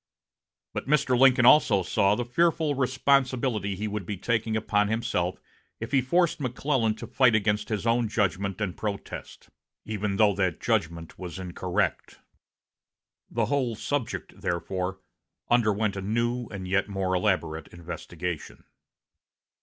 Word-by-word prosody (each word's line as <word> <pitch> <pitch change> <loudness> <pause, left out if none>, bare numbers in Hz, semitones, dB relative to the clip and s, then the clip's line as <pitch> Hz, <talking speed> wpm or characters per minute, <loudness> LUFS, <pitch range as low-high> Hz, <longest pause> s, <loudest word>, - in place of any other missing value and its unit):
But - - -4
Mr. 135 -3 +3
Lincoln 125 -1 +5
also 110 -8 +6
saw 100 +3 +2
the 120 - -2
fearful 160 +3 +2
responsibility 130 -5 +1
he 105 +3 -3
would 105 -1 -3
be 100 - -3
taking 110 +2 0
upon 105 -1 +1
himself 110 -5 -1 0.4
if 115 +2 -6
he 135 -2 +4
forced 170 +7 +2
McClellan 125 -3 0
to - - -8
fight 125 -3 +3
against 105 0 0
his 110 -1 -2
own 115 0 +2
judgment 100 -2 -1
and 100 -5 -2
protest, 105 -2 -6 0.4
even 105 -2 -2
though 105 0 +4
that 95 -2 -1
judgment 85 -8 -2
was 90 -2 -6
incorrect. 90 -1 -2 1.1
The - - 0
whole 130 -5 0
subject, 135 +3 -4
therefore, 95 +2 -2 0.5
underwent 110 -3 +2
a 95 - -4
new 120 +4 -1
and 95 -3 -7
yet 100 +2 +1
more 95 -2 -1
elaborate 90 -5 0
investigation. 85 0 -6
105 Hz, 135 wpm, -27 LUFS, 95-120 Hz, 1.1 s, also